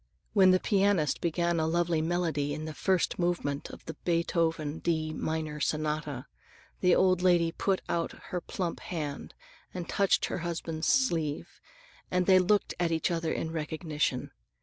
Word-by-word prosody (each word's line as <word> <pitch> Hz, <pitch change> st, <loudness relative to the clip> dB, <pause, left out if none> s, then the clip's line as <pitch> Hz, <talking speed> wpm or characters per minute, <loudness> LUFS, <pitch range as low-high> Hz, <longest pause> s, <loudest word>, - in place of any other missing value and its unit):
When 190 Hz, -3 st, +6 dB
the 185 Hz, 0 st, +5 dB
pianist 195 Hz, -7 st, +2 dB
began 170 Hz, 0 st, +1 dB
a 160 Hz, -, +1 dB
lovely 170 Hz, -1 st, +1 dB
melody 160 Hz, -4 st, 0 dB
in 155 Hz, +1 st, -5 dB
the 155 Hz, -, -5 dB
first 185 Hz, +3 st, 0 dB
movement 170 Hz, -5 st, -1 dB
of -, -, -11 dB
the -, -, -5 dB
Beethoven 165 Hz, -3 st, 0 dB
D 155 Hz, -2 st, -1 dB
minor 155 Hz, -1 st, -3 dB
sonata, 150 Hz, -3 st, -2 dB, 0.5 s
the 180 Hz, -1 st, +4 dB
old 185 Hz, -1 st, +3 dB
lady 175 Hz, -2 st, +4 dB
put 190 Hz, +2 st, -1 dB
out 170 Hz, -1 st, -1 dB, 0.2 s
her 180 Hz, -, -2 dB
plump 175 Hz, -1 st, -3 dB
hand 150 Hz, -5 st, -5 dB, 0.4 s
and 180 Hz, -1 st, -4 dB
touched 195 Hz, -1 st, +2 dB
her -, -, -3 dB
husband's 165 Hz, -1 st, -3 dB
sleeve 165 Hz, -, 0 dB, 0.5 s
and 180 Hz, 0 st, +1 dB
they 185 Hz, 0 st, +6 dB
looked 200 Hz, +3 st, +2 dB
at 170 Hz, -1 st, +1 dB
each 165 Hz, +1 st, 0 dB
other 165 Hz, -1 st, -1 dB
in 160 Hz, -, -2 dB
recognition. 155 Hz, -4 st, -2 dB
165 Hz, 155 wpm, -29 LUFS, 155-180 Hz, 0.5 s, When